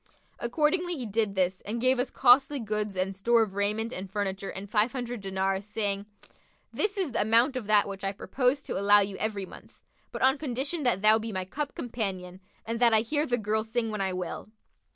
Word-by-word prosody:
Accordingly 325 +7 0
he 250 - -4
did 215 -1 -1
this 185 0 0
and 225 +3 -4
gave 255 +1 +2
us 250 - 0
costly 270 +3 +4
goods 210 -3 -3
and 190 +1 -1
store 230 +4 +3
of 205 -3 -6
raiment 210 +4 -1
and 190 +1 -6
furniture 195 -1 -3
and 195 +1 -7
five 210 +3 +2
hundred 245 -3 -4
dinars, 190 0 -1
saying, 205 -1 -2 0.7
'This 420 0 -1
is 370 -8 -1
the - - 0
amount 230 +5 +3
of 245 -5 -4
that 210 -1 +4
which 195 -1 -7
I 195 - 0
purpose 250 +6 -1
to - - -3
allow 205 +1 +6
you 200 0 -2
every 205 -3 -2
month, - - -15 0.3
but - - -4
on 265 +2 +4
condition 280 +3 -2
that 240 -7 +1
thou 215 +1 +6
be 225 +1 -5
my 185 -2 -3
cup 285 +9 -5
companion 190 -6 -4 0.3
and 230 +1 -3
that 235 -2 +5
I 215 - +5
hear 295 +6 -1
the 245 - +1
girl 215 0 -1
sing 225 0 -2
when 210 -2 -3
I 190 -1 0
will.' 180 +2 -5
220 Hz, 215 wpm, -28 LUFS, 195-250 Hz, 0.7 s, allow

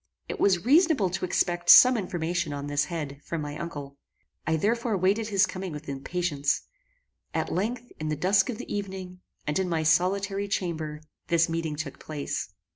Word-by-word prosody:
It - - -5
was 185 -1 +3
reasonable 290 - +4
to 185 - -2
expect 175 -1 0
some 255 0 +10
information 175 -5 -2
on 140 0 -4
this 145 0 0
head, 150 -5 -5
from 165 -2 -4
my 145 0 -5
uncle. 145 -4 -7 0.5
I 160 - +2
therefore 225 +5 0
waited 200 +4 +1
his 200 -2 +3
coming 185 0 -5
with 150 0 -8
impatience. 140 +1 -1 0.7
At - - -1
length, 235 +6 -2
in 155 0 -3
the 155 - 0
dusk 190 - +3
of 235 - -3
the - - -5
evening, 190 -2 -6 0.2
and 150 +4 0
in 185 -1 0
my 165 -2 0
solitary 195 +5 +1
chamber, 160 -6 -3 0.3
this 165 -1 +3
meeting 165 -2 -2
took 150 -2 -6
place. 150 -2 -4
175 Hz, 175 wpm, -27 LUFS, 155-195 Hz, 0.7 s, some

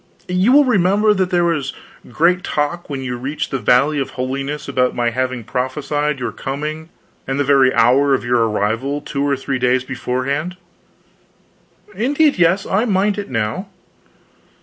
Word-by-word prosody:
You 185 +6 +2
will 290 +2 +6
remember 210 -2 +3
that 185 -2 0
there 175 -1 +2
was 155 -5 -1 0.4
great 170 +7 +2
talk, 150 +4 -2
when 135 -2 -4
you 125 -1 -4
reached 135 +5 -4
the 135 - -1
Valley 140 +7 +3
of 135 - -2
Holiness, 135 +3 -3
about 130 -2 0
my 120 -1 0
having 130 0 -2
prophesied 145 +5 -2
your 120 -3 -3
coming 150 +4 -5 0.4
and 135 +1 -2
the - - +3
very 135 -2 +4
hour 135 +4 +4
of 130 - -4
your 120 -1 +2
arrival, 115 +8 -1
two 140 -1 -4
or 140 -1 +1
three 135 0 -3
days 125 +1 +2
beforehand." 135 +6 -3 1.4
"Indeed, 285 - +1
yes, 175 +3 +3
I 210 +5 +1
mind 205 -1 +1
it 200 - -6
now." 115 - -2
140 Hz, 160 wpm, -18 LUFS, 130-175 Hz, 1.4 s, will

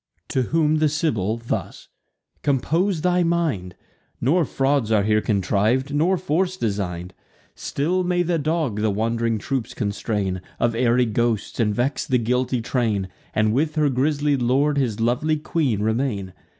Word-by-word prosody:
To 130 - +1
whom 155 +3 +2
the 155 -1 +3
Sibyl 115 - 0
thus: 115 0 -5 0.5
"Compose 160 +6 +1
thy 180 +1 +2
mind; 160 - 0 0.4
Nor 160 +7 +2
frauds 135 -5 0
are 105 -2 +4
here 105 +1 +2
contriv'd, 110 +7 +1
nor 170 +6 +2
force 185 +2 0
design'd. 95 - -3 0.4
Still 175 +6 -1
may 175 0 +1
the 170 -1 0
dog 150 -8 -1
the 110 - +2
wand'ring 115 +2 0
troops 130 +2 -3
constrain 100 -3 -2 0.2
Of 120 -1 +2
airy 120 +1 +3
ghosts, 115 0 -1
and 105 -3 +1
vex 130 +5 -1
the 130 - +3
guilty 125 +1 0
train, 110 -7 0 0.3
And 110 0 +2
with 150 +5 0
her 150 -2 +3
grisly 145 +2 +1
lord 140 +3 +2
his 115 -6 -1
lovely 125 +7 +1
queen 150 - -1
remain. 110 -4 -1
125 Hz, 150 wpm, -23 LUFS, 110-155 Hz, 0.5 s, are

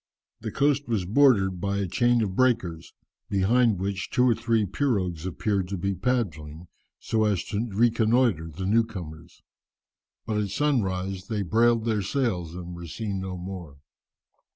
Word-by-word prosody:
The - - -5
coast 145 0 +1
was 110 -6 -1
bordered 100 -6 +3
by 100 0 -1
a 100 - 0
chain 120 +4 +2
of 95 -3 -3
breakers, 95 -10 0 0.4
behind 110 +3 +3
which 95 +1 -3
two 125 - +2
or 120 - +5
three 115 -2 +1
pirogues 95 - -1
appeared 95 +1 -1
to 100 +1 -4
be 100 +3 -1
paddling, 85 -10 -2 0.3
so 110 -1 0
as 100 -4 +1
to 110 +2 -1
reconnoitre 115 -4 +2
the 95 +4 -6
new 110 +4 +4
comers. 85 -6 -10 0.8
But 110 - -2
at 100 - -2
sunrise 95 -7 -1
they 105 -3 -2
brailed 115 +5 +2
their 110 -3 +1
sails 95 - -1
and 90 -1 -7
were 85 0 -8
seen 100 +3 -4
no 95 -1 -5
more. 90 -5 -8
100 Hz, 155 wpm, -26 LUFS, 90-115 Hz, 0.8 s, or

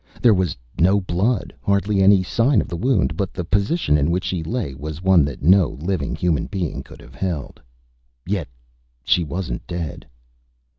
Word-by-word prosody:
There 120 -3 +5
was 95 -7 0 0.2
no 95 +4 +4
blood, 95 +4 -1
hardly 100 0 +1
any 95 -1 +6
sign 115 +5 +2
of - - -1
the - - -5
wound; 85 - +1
but 95 +2 -2
the 90 - -3
position 100 - +1
in 70 +3 +1
which 90 +2 0
she 90 -3 -2
lay 85 - -3
was 75 +4 -7
one 95 -4 +5
that 70 -3 -6
no 90 +1 +4
living 85 -3 -2
human 85 -5 0
being 90 -6 -3
could - - -14
have - - -15
held. 85 -7 -4 0.6
Yet 95 -1 -2 0.6
she 85 - +2
wasn't 75 -5 -5
dead. 85 -4 -5
90 Hz, 170 wpm, -21 LUFS, 80-100 Hz, 0.6 s, any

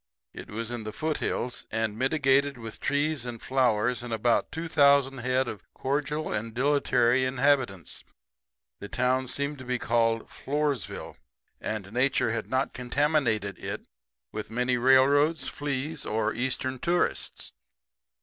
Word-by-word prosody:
It - - -9
was 115 +2 -4
in 120 -2 -4
the 110 - -5
foothills, 150 -3 -2
and 110 -1 -1
mitigated 135 +1 +2
with 115 -2 -8
trees 145 -1 0
and 120 -2 -6
flowers 125 -2 +1
and 120 -1 -7
about 115 +1 +1
2,000 140 -4 +3
head 130 +2 +1
of 105 -5 -6
cordial 150 +3 -2
and 110 +2 -4
dilatory 130 -2 +3
inhabitants. 130 - +1 0.8
The 100 - -8
town 130 +1 +1
seemed 140 +2 -2
to - - -8
be 125 0 -1
called 115 -1 +1
Floresville, 145 -5 -3 0.4
and 105 -2 -4
Nature 125 -2 +2
had 115 -1 -3
not 130 +1 0
contaminated 125 - 0
it - - -5 0.5
with 110 - -5
many 125 +2 +1
railroads, 135 +4 +4
fleas 145 +2 -3
or 110 0 0
Eastern 130 +1 -2
tourists. 175 +4 -1
130 Hz, 130 wpm, -27 LUFS, 115-140 Hz, 0.8 s, railroads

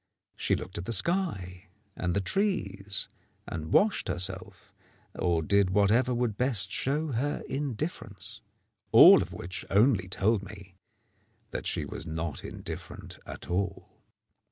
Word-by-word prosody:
She - - +1
looked 100 +3 -6
at 95 - -6
the 115 - -1
sky 105 - 0 0.3
and 90 -1 -2
the 100 - +1
trees, 105 - -1 0.4
and 80 -1 -5
washed 205 - +3
herself, 90 -1 -3 0.4
or 85 -2 0
did 100 +2 +3
whatever 105 +6 +3
would 120 -4 -1
best 110 -7 +2
show 150 +3 -1
her 135 +5 -2
indifference. 135 - -5 0.5
All - - +9
of - - -5
which 90 +3 -6
only 105 -2 +3
told 100 +3 +1
me 100 -1 -11 0.8
that - - -4
she - - -1
was 85 - -7
not 80 -2 -4
indifferent - - -8
at - - -8
all. 95 +2 -2
100 Hz, 130 wpm, -29 LUFS, 90-125 Hz, 0.8 s, All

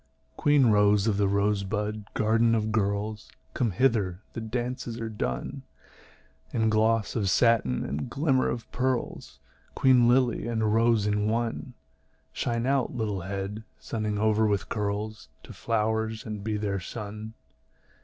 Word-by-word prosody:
Queen 145 -2 +4
rose 105 -2 +4
of 105 -3 +1
the 100 -1 +2
rosebud 105 +1 -1
garden 115 +1 +3
of 110 -1 -1
girls, 105 0 -1 0.2
Come 120 - +1
hither, 100 -4 +1
the 115 - -5
dances 120 +1 -4
are 115 -1 -3
done, 65 -12 -3 0.9
In 110 -1 +1
gloss 110 0 +2
of 100 -5 +1
satin 110 - +2
and 70 +2 -4
glimmer 135 -3 +1
of 120 -1 -4
pearls, 125 - -2 0.4
Queen 125 -3 +5
lily 125 -2 +2
and 110 -2 0
rose 115 -2 +3
in 105 0 +1
one; 120 +2 -2 0.6
Shine 115 0 -1
out, 135 -1 0
little 105 -5 -2
head, 100 +3 -5
sunning 105 -2 -3
over 110 +1 +2
with 100 -2 -1
curls, 105 -2 -3
To - - -11
the - - -9
flowers, 110 0 -1
and 105 -2 -5
be 110 0 -1
their 100 -2 -2
sun. 105 +3 -7
110 Hz, 145 wpm, -27 LUFS, 105-115 Hz, 0.9 s, Queen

